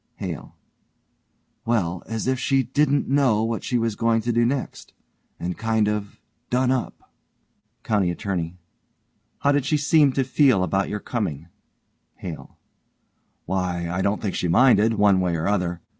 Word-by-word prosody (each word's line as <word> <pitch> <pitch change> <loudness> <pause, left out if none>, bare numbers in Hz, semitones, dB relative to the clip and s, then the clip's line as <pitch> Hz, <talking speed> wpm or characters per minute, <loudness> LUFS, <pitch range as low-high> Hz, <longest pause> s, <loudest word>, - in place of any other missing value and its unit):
HALE: - - -7 1.1
Well, 90 -7 0
as 115 -1 -3
if 130 0 0
she 135 +1 +2
didn't 140 +3 +1
know 130 -6 +2
what 115 -1 -2
she 125 - 0
was 115 -2 -1
going 115 0 +1
to 120 +2 -1
do 120 0 +2
next. 130 +1 -4 0.5
And 90 +1 -3
kind 110 -1 0
of 105 -1 -3 0.3
done 125 +1 +2
up. 130 -2 -4 0.7
COUNTY 100 -5 +1
ATTORNEY: 90 -2 -3 0.8
How 140 - +3
did 145 -1 +2
she 150 +3 +1
seem 150 -1 +4
to 135 - +1
feel 130 -6 +3
about 95 +2 0
your 105 - -3
coming? 85 - -4 0.7
HALE: 85 -4 -9 0.9
Why, 90 -2 -2
I 90 +2 -1
don't 100 +2 0
think 100 - -1
she 90 - -1
minded 115 +3 +4
one 100 -3 +4
way 90 -2 0
or 80 0 -2
other. 90 -4 -1
110 Hz, 155 wpm, -23 LUFS, 90-130 Hz, 1.1 s, seem